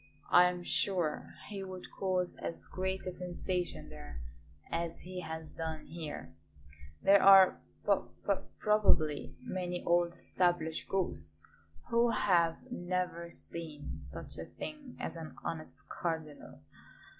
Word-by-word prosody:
I 180 0 +8
am 180 0 -4
sure 175 -5 +1
he 200 -2 -4
would 185 -1 -7
cause 185 -2 0
as 165 - -5
great 190 0 -2
a 185 - -1
sensation 180 0 -3
there 70 -5 -8 0.5
as 165 0 -2
he 185 +1 -6
has 160 -2 -6
done 160 -1 -4
here; 150 - -6 0.7
there 200 0 +7
are 195 -1 +8 0.2
p - - +3 0.3
p - - +4 0.2
probably 185 -8 +3
many 180 -6 -2
old 175 0 +3
established 175 -3 0
ghosts 80 - -1 0.5
who 235 +1 +5
have 170 -7 +3
never 180 -4 -2
seen 155 - -7
such 70 +2 -8
a 80 - -4
thing 295 - -8
as - - -3
an 160 -1 -7
honest 155 -2 -5
cardinal. 160 -3 -4
175 Hz, 125 wpm, -33 LUFS, 160-185 Hz, 0.7 s, I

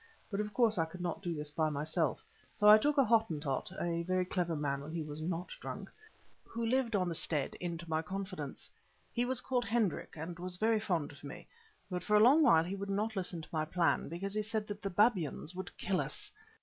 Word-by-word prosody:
But 200 - -1
of 210 0 -2
course 220 -4 +3
I 165 - +3
could 160 +3 -10
not 175 0 -3
do 175 -3 -2
this 150 -1 +1
by 155 +1 +1
myself, 155 +3 -1 0.3
so 210 - +3
I 210 +1 +10
took 295 +5 +1
a 275 - +7
Hottentot—a 170 - 0
very 185 +1 0
clever 175 -2 -1
man 140 -2 -1
when 150 +3 -7
he 165 -1 -2
was 150 0 -7
not 170 +2 -3
drunk—who 435 - -8
lived 240 -1 +1
on 185 -2 +2
the 170 - -1
stead, 150 -3 -1
into 170 -1 -4
my 160 0 0
confidence. 185 -5 -5 0.5
He 240 0 +1
was 255 0 +1
called 250 -2 0
Hendrik, 220 -3 0
and 165 +3 -6
was 180 0 +3
very 220 +2 +3
fond 175 -9 -1
of 145 - -15
me; 155 +5 -9 0.4
but 180 -1 -4
for 210 - +2
a - - +7
long 260 +9 +7
while 165 - +6
he 180 +3 -4
would 200 0 -4
not 210 +3 -1
listen 180 -3 -3
to - - -12
my 155 -1 +1
plan, 170 0 +1
because 190 +5 -4
he 215 - 0
said 215 0 -2
that 205 0 -5
the 195 - -2
babyans 185 - +2
would 185 +1 -7
kill 185 -1 0
us. 420 0 -6
185 Hz, 220 wpm, -33 LUFS, 160-215 Hz, 0.5 s, I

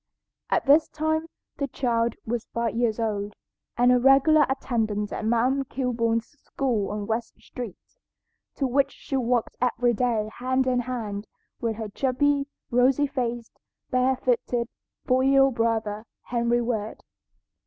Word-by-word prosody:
At - - +1
this 290 +3 +5
time 315 +1 -1 0.3
the 280 - -1
child 235 -3 0
was 235 0 -3
five 235 -1 0
years 235 -2 +1
old, 210 -2 -2 0.4
and 245 +1 +5
a 250 - +5
regular 275 +3 +5
attendant 220 -6 -1
at - - -4
"Ma'am 240 +5 +2
Kilbourne's" 230 -3 -1 0.2
school 235 -8 -1
on 210 0 -3
West 225 +1 -3
Street, 235 -7 -7 0.8
to 275 - -1
which 270 +2 +2
she 275 - -6
walked 245 -2 0
every 245 -1 +2
day 230 -2 0
hand 260 +1 +1
in 255 -1 +2
hand 225 -5 -4 0.3
with 230 -2 -1
her 220 0 -5
chubby, 275 +5 +1 0.2
rosy 255 +4 +4
faced, 240 -4 -4 0.3
bare 255 +1 +3
footed, 245 -1 0 0.4
four 255 +1 +3
year 270 0 +5
old 270 -1 +3
brother, 225 -2 -1 0.2
Henry 240 0 +1
Ward. 220 -3 -3
245 Hz, 145 wpm, -25 LUFS, 230-265 Hz, 0.8 s, this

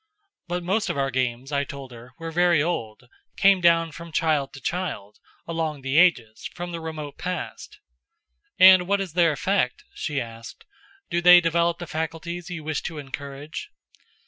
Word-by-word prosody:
But 175 0 -3
most 200 +5 0
of - - -2
our 135 -1 0
games, 130 +1 -2
I 140 -1 +1
told 140 -2 -9
her, 120 +1 -13
were 165 0 -6
very 175 -1 +3
old 125 -7 -3 0.3
came 195 -1 +5
down 165 -1 +4
from 170 +2 -10
child 155 -4 +1
to 135 - -9
child, 145 - -4 0.3
along 160 -3 -3
the 135 +3 +2
ages, 120 -12 +2
from 175 0 -5
the 170 - -5
remote 155 -3 -7
past. 180 -1 -5 0.8
"And 185 -1 +8
what 200 +1 +2
is 190 -5 -4
their 170 -2 +4
effect?" 145 -2 0
she 145 -2 -3
asked. 115 -1 -9 0.5
"Do 175 - +1
they 180 0 +9
develop 170 0 +1
the 175 - -6
faculties 165 +2 -5
you 175 -3 -6
wish 155 -1 -2
to 165 - -6
encourage?" 140 +1 -7
160 Hz, 170 wpm, -24 LUFS, 135-175 Hz, 0.8 s, they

